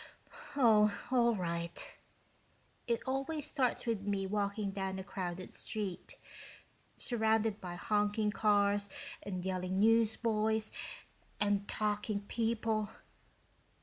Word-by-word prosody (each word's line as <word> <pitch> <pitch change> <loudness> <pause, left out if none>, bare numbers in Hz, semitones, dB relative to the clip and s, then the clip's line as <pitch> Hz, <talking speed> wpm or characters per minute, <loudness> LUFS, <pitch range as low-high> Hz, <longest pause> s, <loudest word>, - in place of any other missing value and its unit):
"Oh, 215 -6 +5
all 235 -2 +4
right. 170 -2 -2 1.0
It 235 -1 0
always 275 +3 -1
starts 260 -6 0
with 225 -4 0
me 200 -1 -1
walking 200 0 -1
down 190 -1 -3
a 190 - -4
crowded 185 -1 -5
street, 210 - -4 0.8
surrounded 220 -2 +1
by 175 -2 -5
honking 210 +2 +1
cars 205 -1 +3 0.3
and 185 -2 -4
yelling 185 0 -1
newsboys 220 0 +3 0.7
and 205 -1 +1
talking 210 -1 -1
people. 220 0 0
210 Hz, 100 wpm, -34 LUFS, 195-225 Hz, 1.0 s, Oh